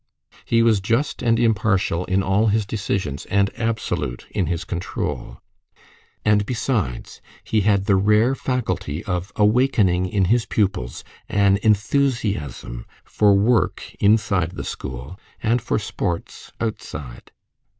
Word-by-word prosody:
He 115 0 +3
was 110 -3 +4
just 115 +9 -1
and 115 -1 +2
impartial 100 -6 +1
in 95 +1 +1
all 100 +4 +2
his 105 0 +2
decisions, 95 -8 -3
and 100 0 +2
absolute 110 - -2
in 100 -5 -1
his 85 0 -2
control; 85 +1 -4 0.9
and 105 -1 +4
besides, 110 - -2 0.2
he 110 - +1
had 100 -1 +2
the 100 -2 +3
rare 105 +6 +3
faculty 125 - -2
of 90 +1 -3
awakening 105 -5 +3
in 95 0 +1
his 115 +5 +2
pupils 95 - -1 0.3
an 100 -1 +3
enthusiasm 105 - 0 0.2
for 105 -2 +3
work 105 +2 +1
inside 100 -5 +2
the - - -5
school 65 +8 -7 0.2
and 115 +2 +2
for 115 - -1
sports 90 -4 -4
outside. 70 - -6
100 Hz, 125 wpm, -22 LUFS, 90-115 Hz, 0.9 s, was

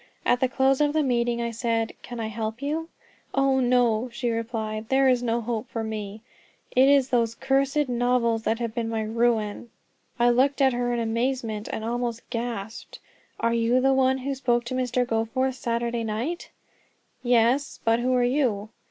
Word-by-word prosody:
At 245 - +3
the 260 - +1
close 265 +1 +2
of 295 0 +2
the 310 -1 +2
meeting 240 -2 0
I 235 - -2
said, 230 -1 -1
"Can 240 -1 -8
I 225 - -2
help 220 +1 -4
you?" 310 +4 -3 0.5
"Oh, 270 -1 +3
no," 245 -2 +2
she 240 0 -2
replied, 220 -1 -3
"there 270 0 +4
is 250 -2 +3
no 235 -1 0
hope 230 +1 -3
for 225 - -3
me; 215 -1 -5 0.5
it 260 +2 +6
is 275 -2 +4
those 230 -2 +1
cursed 275 +3 +1
novels 245 -2 +1
that 225 0 0
have 230 -2 -3
been 230 -1 -2
my 225 -1 -1
ruin." 225 0 0 0.5
I 240 0 +4
looked 270 +4 +2
at 265 -2 +4
her 245 0 -1
in 240 - 0
amazement, 230 -1 -2
and 220 - -4
almost 235 0 -3
gasped: 230 -3 -5 0.4
"Are 230 0 +1
you 235 +2 +2
the 270 +1 +3
one 265 0 +3
who 270 +1 -3
spoke 240 -3 0
to 240 - -5
Mr. 250 -1 0
Goforth 240 +4 0
Saturday 235 -1 -2
night?" 230 +11 -3 0.7
"Yes; 245 +3 +2
but 230 +1 +3
who 250 +2 0
are 250 - +3
you?" 245 -5 0
240 Hz, 180 wpm, -25 LUFS, 230-260 Hz, 0.7 s, it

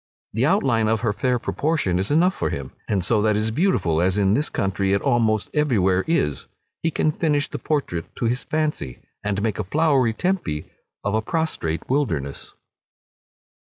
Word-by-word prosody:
The 115 +6 +2
outline 130 - +2
of 110 0 +1
her 115 -4 +1
fair 125 +4 +1
proportions 130 - 0
is 95 - -1
enough 175 +5 +4
for - - -2
him; 65 -2 -5 0.2
and 95 -4 0
so 110 -3 +2
that 105 0 +2
is 110 +1 0
beautiful, 110 - +1
as 95 +2 +1
in 100 -1 +3
this 145 +7 +1
country 95 0 0
it 100 - +1
almost 115 -5 +1
every 150 -6 +2
where 95 0 +2
is, 75 - 0 0.3
he 165 - +1
can 155 0 +1
finish 150 -2 +1
the - - -6
portrait 135 - -1
to - - -2
his 120 +3 0
fancy, 150 - -2 0.3
and 100 0 -1
make 110 -3 -1
a - - 0
flowery 135 - +2
Tempe 115 - -1 0.4
of 100 - -1
a 110 - +2
prostrate 110 - -2
wilderness. 80 - -2
110 Hz, 180 wpm, -23 LUFS, 95-150 Hz, 0.4 s, enough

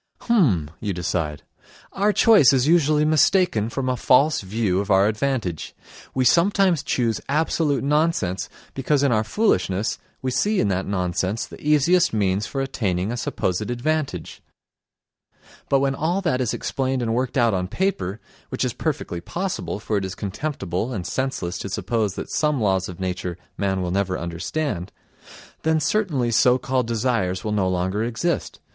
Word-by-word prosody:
"H'm!" 115 - +2
you 105 -2 -2
decide. 80 -4 -2 0.5
"Our 205 +2 +2
choice 205 - +6
is 130 +1 +2
usually 155 -2 +4
mistaken 155 - +3
from 130 +2 -3
a 130 - +1
false 135 +5 +3
view 95 -1 0
of 100 +1 -3
our 95 0 +5
advantage. 110 - -2 0.4
We 130 -1 +2
sometimes 180 0 +3
choose 120 -6 -1
absolute 150 -1 +1
nonsense 140 - 0 0.2
because 135 +1 +1
in 140 - +3
our 110 -2 +2
foolishness 110 - 0 0.2
we 130 - -1
see 205 +11 +1
in 105 - +2
that 95 0 -1
nonsense 95 +2 -1
the - - -13
easiest 150 +3 +3
means 100 -1 0
for 135 - -3
attaining 100 -7 -1
a - - -2
supposed 105 -3 -2
advantage. 130 - -2 1.3
But 135 -1 +3
when 135 0 +1
all 165 +7 0
that 130 -9 0
is 120 - 0
explained 130 -2 -2
and 115 -1 0
worked 125 +3 -1
out 120 -3 +3
on 90 -1 -1
paper 100 - -2 0.3
(which - - -1
is - - -2
perfectly 85 -1 -3
possible, 105 - -3
for 105 0 -1
it 100 - -1
is 95 0 -5
contemptible 100 - -3
and 95 -6 -4
senseless 95 -6 -2
to 100 - -5
suppose 105 0 -1
that - - -6
some 150 -3 +1
laws 95 -4 +1
of 90 - -9
nature 90 -1 -3 0.2
man 95 -2 -1
will 90 - -2
never 95 -1 0
understand), 90 - -3 0.7
then 160 0 +2
certainly 150 - 0
so 125 +2 +4
called 130 -2 -1
desires 115 -6 0
will 105 - -2
no 100 -3 +1
longer 95 +4 -1
exist. 120 +9 -2
115 Hz, 165 wpm, -23 LUFS, 95-145 Hz, 1.3 s, choice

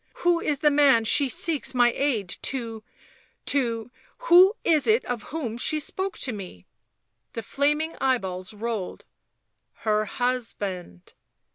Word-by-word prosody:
*' - - -37
Who 350 -1 +3
is 290 -3 -1
the 300 - +4
man 280 -6 +4
she 275 +4 +2
seeks 285 -1 -2
my 240 -1 +4
aid 250 -9 0
to... 230 -4 -1 0.6
to... 235 -4 0 0.3
who 380 -3 +6
is 305 -6 +2
it 225 +3 +3
of 245 -3 -3
whom 245 -7 -4
she 310 +4 0
spoke 380 +6 -4
to 255 - -1
me?" 185 - -9 0.7
The 230 - -5
flaming 300 +3 0
eyeballs 190 -8 -1
rolled. 215 -3 -5 0.4
" - - -53
Her 215 0 +2
husband." 200 - -4
245 Hz, 140 wpm, -25 LUFS, 220-290 Hz, 0.7 s, who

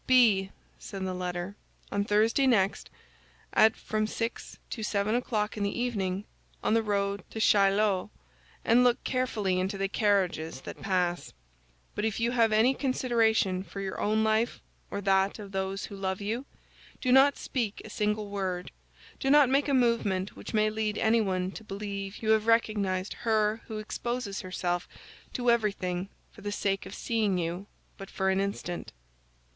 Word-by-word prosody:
"Be," 220 -7 +5 0.3
said 195 -1 -6
the 185 - -2
letter, 180 +1 -4 0.4
"on 200 0 +1
Thursday 220 +6 +3
next, 195 -6 +2 0.6
at 220 0 +5
from 215 0 -1
six 230 +1 -4
to 225 - -4
seven 210 0 0
o'clock 225 -3 -1
in - - -3
the 200 +3 -1
evening, 200 -5 -1 0.4
on - - +2
the 225 - +4
road 200 -2 -1
to 220 - -6
Chaillot, 200 -1 +3 0.6
and 240 +2 +5
look 245 -1 +3
carefully 215 -8 0
into 190 +2 -1
the 195 0 0
carriages 185 - 0
that - - -9
pass; 180 -3 -1 0.6
but 210 - -3
if 220 0 -1
you 235 +1 +1
have 230 -3 +3
any 225 +5 +4
consideration 230 -8 +1
for 200 - -9
your 195 -1 -4
own 215 +1 +2
life 220 +2 +1 0.3
or 200 - -4
that 195 0 +2
of 205 -2 -9
those 195 0 -2
who 200 - -9
love 190 -1 -2
you, 225 +6 -3 0.5
do 255 - 0
not 270 +2 +6
speak 230 -6 -3
a - - -9
single 210 0 -1
word, 185 -3 -3 0.5
do 270 - 0
not 290 -2 +6
make 275 +2 +2
a 280 - +1
movement 215 -6 +1
which - - -8
may 215 -1 +2
lead 215 -1 -1
anyone 195 -5 +1
to 220 - -9
believe 200 0 -6
you 220 - +3
have 220 0 +3
recognized 205 -5 +1
her 220 -1 +1
who 220 - -5
exposes 215 -1 -3
herself 175 -1 -2 0.4
to 245 -1 +2
everything 195 -5 0 0.2
for 215 - -15
the 205 0 -3
sake 195 -1 -1
of 195 - -8
seeing 215 -5 0
you 175 +3 -3 0.3
but 195 - -8
for 190 0 0
an 190 - +1
instant." 195 -3 -4
210 Hz, 165 wpm, -29 LUFS, 195-225 Hz, 0.6 s, not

